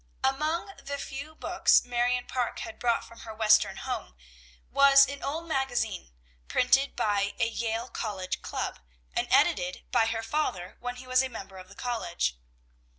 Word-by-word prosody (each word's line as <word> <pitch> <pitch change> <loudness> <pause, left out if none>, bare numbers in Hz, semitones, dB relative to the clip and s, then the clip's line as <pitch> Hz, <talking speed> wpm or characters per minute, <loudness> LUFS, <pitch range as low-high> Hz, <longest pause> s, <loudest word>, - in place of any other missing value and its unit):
Among 310 +8 0
the 280 0 -5
few 280 +3 -7
books 350 +3 +3
Marion 245 0 0
Parke 250 -2 -2
had 335 - -7
brought 235 -1 +1
from 230 - -14
her 220 -1 -9
Western 215 -1 +4
home, - - -5 0.6
was 275 0 +7
an 280 +1 -6
old 325 +4 -3
magazine, 245 - -1 0.4
printed 270 +2 +3
by 205 -1 0
a 225 - +2
Yale 230 +1 -2
College 200 -6 -4
club, - - -4 0.4
and - - 0
edited 180 +1 +2
by 230 -3 +4
her 225 0 -2
father 225 -9 -2
when 245 0 -4
he 250 +1 -10
was 255 0 +4
a 265 - -2
member 195 -5 -9
of 185 0 -12
the 200 - -14
college. 205 - -2
245 Hz, 160 wpm, -28 LUFS, 215-275 Hz, 0.6 s, was